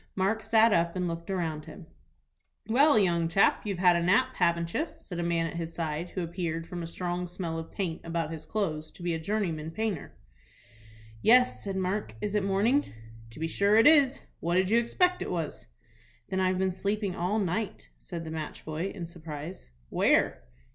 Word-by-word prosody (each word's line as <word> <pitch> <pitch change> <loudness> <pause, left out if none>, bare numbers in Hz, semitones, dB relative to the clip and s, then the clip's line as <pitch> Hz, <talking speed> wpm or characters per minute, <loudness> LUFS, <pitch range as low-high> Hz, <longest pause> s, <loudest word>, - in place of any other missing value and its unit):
Mark 195 +4 +1
sat 225 0 +4
up 170 0 +2
and 180 -1 -1
looked 170 +1 -5
around 165 -5 -2
him. 180 - -11 0.8
"Well, 275 +4 +5
young 170 -5 +3
chap, 165 +4 +3
you've 200 -3 -2
had 180 -1 +5
a 170 - +1
nap, 225 +9 +3
haven't 170 -1 +1
you?" 315 - 0
said 175 -2 -7
a - - 0
man 170 -1 +1
at 165 +1 -5
his 165 -1 -5
side, 165 +1 -3
who 185 - -3
appeared, 165 -1 -3
from 175 0 -6
a 165 - -4
strong 180 +1 -3
smell 170 -2 -4
of 160 - -7
paint 175 -5 -3
about 165 -1 -2
his 160 -1 -6
clothes, 160 -8 -2
to 175 - -13
be 175 -1 0
a 160 - -2
journeyman 165 -4 -2
painter. 210 -2 -3 1.1
"Yes," 250 +2 +5
said 195 -1 -3
Mark. 190 - -2
"Is 205 - -3
it 210 -2 +1
morning?" 210 +9 +2 0.4
"To 115 - -12
be 165 - -1
sure 200 +5 +2
it 225 +2 +6
is. 285 -4 +6 0.2
What 170 +1 0
did 185 +2 +2
you 230 - +6
expect 360 +10 +1
it - - -3
was?" 165 -4 -4 0.6
"Then 190 - -1
I've 185 0 +2
been 190 0 +1
sleeping 200 +1 -2
all 185 +5 0
night," 195 - -2
said 165 - -6
the 160 - -6
match 160 -1 -6
boy, 155 +4 -2
in 175 -4 -5
surprise. 165 - -8 0.2
"Where?" - - +2
180 Hz, 195 wpm, -29 LUFS, 165-205 Hz, 1.1 s, it